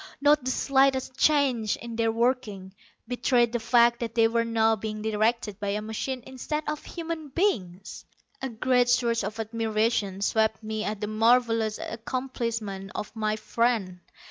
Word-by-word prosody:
Not 290 0 +4
the 255 - -1
slightest 265 -1 +2
change 265 -8 +2
in 235 -1 -8
their 225 0 +1
working 225 -5 -1 0.3
betrayed 245 -1 +2
the 240 - 0
fact 235 +1 +4
that 230 -1 -4
they 225 -1 +5
were 230 0 +1
now 225 -1 +2
being 215 0 -5
directed 220 -1 0
by 205 - -3
a 205 +1 -1
machine 235 +4 -4
instead 280 +4 -4
of 300 0 -3
human 330 -2 -5
beings. 205 - -2 0.4
A 265 - -2
great 245 +1 +2
surge 235 -2 +2
of 210 +3 -5
admiration 220 -3 -1
swept 220 +1 +1
me 215 0 -3
at 210 -1 -4
the - - 0
marvelous 225 0 +2
accomplishment 230 -5 -4
of 210 - -5
my 215 -1 0
friend. 220 -5 -1
230 Hz, 155 wpm, -26 LUFS, 215-250 Hz, 0.4 s, they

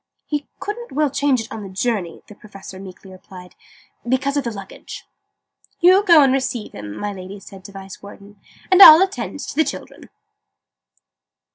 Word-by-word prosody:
"He 295 -1 -4
couldn't 465 - -7
well 295 0 0
change 280 -3 0
it 225 +3 -11
on 220 - -7
the 195 - -9
journey," 190 -3 -4
the - - -14
Professor 195 -2 -13
meekly 190 0 -13
replied, 185 -1 -14 0.6
"because 275 +2 -1
of 285 - -1
the 235 - -3
luggage." 200 -4 -11 0.7
"You 370 +3 +5
go 335 -7 +6
and 265 -1 +2
receive 255 -4 -3
him," 105 0 -9
my 205 0 -5
Lady 190 +1 -10
said 195 -1 -14
to - - -11
the 195 - -12
Vice 195 0 -11
Warden, 200 0 -15 0.3
"and 375 +1 +5
I'll 320 0 +10
attend 385 +1 -5
to - - -8
the 315 - +3
children." - - -9
215 Hz, 175 wpm, -19 LUFS, 195-290 Hz, 0.7 s, I'll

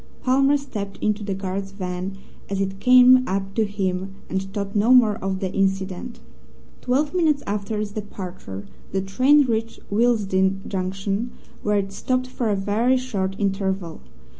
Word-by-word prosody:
Palmer 270 +2 +4
stepped 210 -8 -6
into 210 0 0
the 200 -1 -2
guard's 195 0 -4
van, 185 0 -4 0.3
as 195 -1 -2
it 195 0 -2
came 255 +1 +7
up 195 0 -2
to 220 +1 +2
him, 190 -1 -3 0.2
and 190 - 0
thought 195 +1 -5
no 210 +4 +3
more 220 -5 +5
of 190 0 -3
the 190 -1 -2
incident. 195 +4 -1 0.6
Twelve 280 +6 +1
minutes 315 -5 +2
after 210 +1 -2
its 210 -1 -3
departure 185 - -7 0.3
the 190 - +1
train 260 +9 +4
reached 225 -2 -2
Willesden 195 -4 +2
Junction, 195 +4 -2 0.3
where 210 0 +1
it 195 -1 -1
stopped 255 +5 -1
for 255 -3 -2
a 205 - +2
very 215 +6 +2
short 200 -7 -2
interval. 195 -3 -2
200 Hz, 155 wpm, -23 LUFS, 195-240 Hz, 0.6 s, came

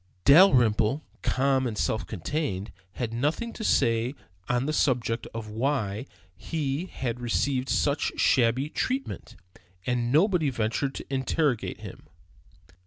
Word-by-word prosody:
Dalrymple, 135 - +5 0.2
calm 135 -1 +1
and 110 -3 -4
self 110 - -1
contained, 105 - -3 0.2
had 115 +1 -4
nothing 150 - -1
to 220 - -7
say 115 - +2 0.3
on 125 +1 +1
the 155 - -1
subject 120 -5 0
of 115 -1 -6
why 110 -1 -1 0.3
he 150 - -3
had 125 -8 -4
received 130 +2 0
such 145 0 +1
shabby 125 +3 +3
treatment, 260 - -3 0.5
and 120 -1 0
nobody 165 0 +3
ventured 120 +3 -1
to - - -7
interrogate 135 -2 0
him. - - -10
130 Hz, 120 wpm, -27 LUFS, 115-145 Hz, 0.5 s, Dalrymple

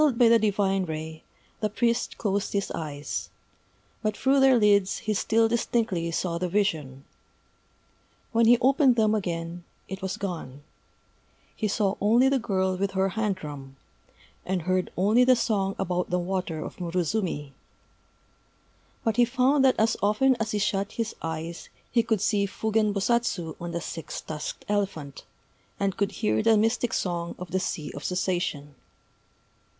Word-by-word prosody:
_ - - +6
Dazzled 280 -6 +2
by 235 -1 +6
the 230 0 +6
divine 195 -2 +1
ray, 160 -1 -6 0.4
the 215 - 0
priest 235 +3 0
closed 200 -2 -1
his 200 -1 -1
eyes: 145 -2 -4 0.7
but 215 -2 -1
through 270 +2 +3
their 265 -2 +6
lids 205 -3 +3
he 215 - +1
still 225 +2 +2
distinctly 225 -6 0
saw 170 0 -2
the 180 0 -1
vision. 155 -9 -1 1.3
When 230 0 +3
he 240 +1 +7
opened 265 +1 +4
them 215 -2 +3
again, 175 -4 -3 0.2
it 190 +1 -7
was 190 0 -3
gone: 160 -8 -6 0.9
he 215 - -1
saw 200 -1 0
only 235 +6 +4
the 270 -1 +2
girl 190 -5 0
with 195 +1 -1
her 190 0 +1
hand 210 0 -1
drum, 145 -5 -9 0.7
and 185 -2 -2
heard 185 +1 0
only 210 +7 +4
the 255 0 +6
song 205 -5 0
about 180 -1 -1
the 180 - +1
water 180 -3 -3
of - - -8
Murozumi. 175 -3 -2 1.5
But 225 -1 0
he 245 - +6
found 260 +3 +3
that 260 -1 +5
as 220 +1 +3
often 215 +6 +3
as 220 -1 -1
he 210 - -1
shut 200 -1 -1
his 230 -1 -3
eyes 165 +1 -5 0.2
he 235 - +4
could 220 -3 0
see 200 -2 +2
Fugen 220 +1 0
Bosatsu 200 -5 0
on 175 0 -4
the 170 0 -3
six 165 -1 -6
tusked 155 -1 -6
elephant, 195 -9 -3 0.5
and 195 -1 0
could 200 0 -1
hear 215 - +2
the 225 0 +4
mystic 225 +2 +1
Song 170 -2 -2
of 180 -1 -8
the 190 - +1
Sea 155 -5 -3
of 145 - -8
Cessation. 175 -5 -2
195 Hz, 160 wpm, -26 LUFS, 175-225 Hz, 1.5 s, he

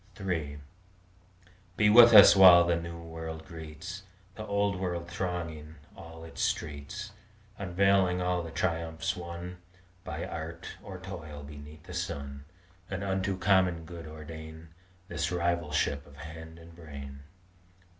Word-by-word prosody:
III 80 -7 -2 1.2
Be 105 - +4
with 120 +1 +10
us 105 -2 +10
while 90 -3 +9
the 85 0 +2
New 85 0 -5
World 80 -1 -7
greets 85 +3 -8 0.3
The 110 +2 -8
Old 100 -1 +1
World 90 -2 -3
thronging 85 -4 -4 0.2
all 80 -1 -11
its 80 - -7
streets, 75 +9 -3 0.5
Unveiling 95 -1 +2
all 90 0 0
the 80 - -7
triumphs 80 -1 -2
won 85 0 -7 0.5
By - - -5
art 80 +1 -6
or 100 -3 -8
toil 80 -6 -8
beneath 75 +2 -11
the 90 - -10
sun; 70 -5 -5 0.4
And 95 0 -3
unto 95 0 -1
common 95 -4 +2
good 85 -1 -9
ordain 80 +1 -9 0.4
This 85 +1 -2
rivalship 85 -5 0
of 70 - -15
hand 80 +1 -9
and 85 0 -14
brain. 70 -4 -9
85 Hz, 130 wpm, -30 LUFS, 80-90 Hz, 1.2 s, with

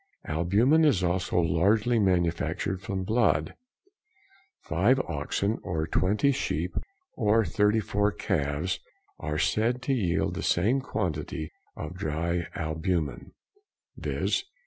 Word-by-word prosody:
Albumen 100 - +3
is 135 - +3
also 90 +1 0
largely 100 +8 +2
manufactured 90 0 0
from 95 -1 -3
blood; 95 -8 +2 1.1
5 105 +11 +2
oxen 100 - -2
or 80 -3 -2
20 105 - +2
sheep 90 - -2 0.4
or 110 0 +2
34 105 0 +2
calves 75 +1 -1 0.4
are 75 0 -3
said 115 +8 +1
to 135 - +1
yield 90 -9 0
the - - -4
same 115 +10 +2
quantity 80 - -3 0.3
of 75 +2 -5
dry 85 -1 -2
albumen, 80 -3 -2 0.6
viz. - - -1
90 Hz, 105 wpm, -27 LUFS, 80-110 Hz, 1.1 s, Albumen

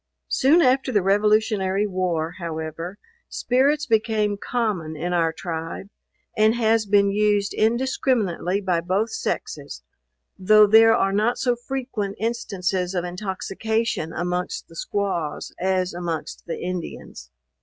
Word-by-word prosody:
Soon 315 +6 +4
after 260 0 +2
the 205 -5 +2
revolutionary 205 0 +2
war, 180 -4 -2
however, 165 +2 -5 0.3
spirits 280 +4 +1
became 215 -3 +1
common 200 -8 -2
in 175 +4 -3
our 165 -2 +2
tribe, 165 +3 -6 0.4
and 215 +1 +4
has 225 -2 +2
been 200 0 +4
used 205 -1 +1
indiscriminately 220 -5 0
by 180 -4 0
both 190 +6 0
sexes; 450 - -4 0.6
though 215 +3 +6
there 225 +2 +6
are 195 - +1
not 215 +4 +1
so 245 -2 +1
frequent 240 -5 -4
instances 195 -5 -2
of 175 -1 -1
intoxication 195 +1 -2
amongst 180 - -3
the - - -15
squaws 195 - -3
as 185 -1 0
amongst 170 -3 -5
the 165 - -4
Indians. 175 - -6
200 Hz, 125 wpm, -23 LUFS, 180-225 Hz, 0.6 s, though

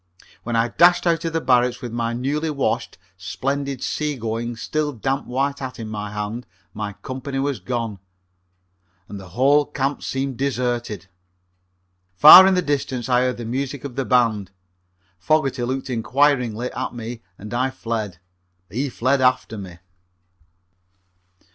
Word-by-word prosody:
When 120 0 -3
I 115 +1 +2
dashed 175 +9 +4
out 165 -1 +2
of 165 - -1
the 165 - +1
barracks 125 -1 +2
with 125 -3 -6
my 115 0 -1
newly 140 +6 -1
washed, 140 -3 -2 0.2
splendidly 135 +9 -3
seagoing, 120 -5 -2
still 150 +5 -2
damp 135 +4 -2
white 140 +3 -1
hat 130 -1 -6
in 110 -2 -6
my 105 -1 -4
hand 105 +3 -5 0.3
my 105 -1 -4
company 135 +1 -5
was 135 -3 -1
gone, 115 0 -3 1.1
and 100 - -8
the 95 -2 -11
whole 140 +3 +5
camp 140 -1 -2
seemed 135 -1 -3
deserted. 120 -6 -2 1.1
Far 185 - +11
in 190 - +3
the 180 - +1
distance 135 -5 -2
I 125 -1 +4
heard 125 -1 0
the 120 - -6
music 135 +3 -3
of 140 -4 -7
the 135 - -1
band. 115 -7 +2 0.7
Fogerty 135 +3 +1
looked 130 +2 -2
inquiringly 125 -1 +1
at 130 -1 -4
me 115 0 -6 0.2
and 105 +3 -9
I 130 +2 +1
fled. 110 -7 -4 0.5
He 135 +7 -1
fled 130 +2 +1
after 125 -3 +2
me. 95 -5 -8
125 Hz, 150 wpm, -22 LUFS, 115-140 Hz, 1.1 s, Far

